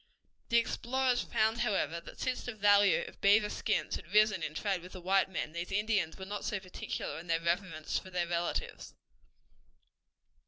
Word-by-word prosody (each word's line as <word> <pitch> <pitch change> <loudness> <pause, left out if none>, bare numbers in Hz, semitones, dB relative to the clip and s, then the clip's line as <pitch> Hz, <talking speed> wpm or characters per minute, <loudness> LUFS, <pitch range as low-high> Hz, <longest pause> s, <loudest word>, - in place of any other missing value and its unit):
The 235 - +4
explorers 250 +2 +1
found, 220 +2 +1
however, 170 -8 0
that - - -12
since 255 -1 -1
the 245 - -6
value 205 -2 +5
of - - -13
beaver 210 +1 +5
skins - - -1
had 170 - -13
risen 210 -3 +4
in 155 -1 -4
trade 195 -2 -1
with 180 +1 -11
the 185 - -7
white 190 +2 +2
men, 175 -4 -3
these 170 +3 -5
Indians 200 -5 0
were 190 - -7
not 205 +1 -5
so 205 - -1
particular 180 -4 -5
in 170 - -11
their 165 -1 +2
reverence 170 -2 -1
for 185 - -12
their 180 -1 -1
relatives. 170 0 -3
195 Hz, 180 wpm, -32 LUFS, 170-215 Hz, -, value